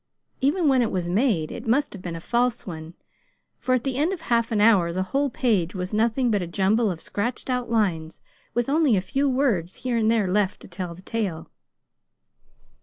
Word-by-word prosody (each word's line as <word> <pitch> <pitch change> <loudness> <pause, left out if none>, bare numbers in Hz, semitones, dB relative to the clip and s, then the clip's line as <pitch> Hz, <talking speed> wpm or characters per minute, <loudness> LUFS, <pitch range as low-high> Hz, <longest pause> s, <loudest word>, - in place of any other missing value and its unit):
Even 305 +5 +2
when 265 -2 +4
it 230 - +1
was 180 -2 -2
made, 190 - +1
it 235 - -7
must 280 +6 +1
have 200 - -9
been 175 -2 -5
a - - -5
false 240 +6 0
one, 165 -3 -8 0.6
for 255 - +1
at 245 - -1
the 265 -2 -2
end 310 +6 +2
of 370 -4 -4
half 235 -6 +1
an 215 - +1
hour 205 -6 +5
the 185 +2 -1
whole 280 +1 +2
page 210 -8 0
was 185 +2 -4
nothing 230 +3 +2
but 205 -2 +1
a 175 - -3
jumble 205 +5 +2
of 175 -4 -4
scratched 235 +8 -3
out 250 -2 -1
lines, 175 -8 0 0.4
with 240 -1 +1
only 285 -6 +3
a - - +3
few 275 +9 0
words 235 -10 0
here 245 -2 +1
and 220 -1 +2
there 225 -4 +2
left 195 +1 +1
to - - -11
tell 180 -2 -6
the 185 - -15
tale. 190 -8 -3
220 Hz, 210 wpm, -24 LUFS, 185-250 Hz, 0.6 s, hour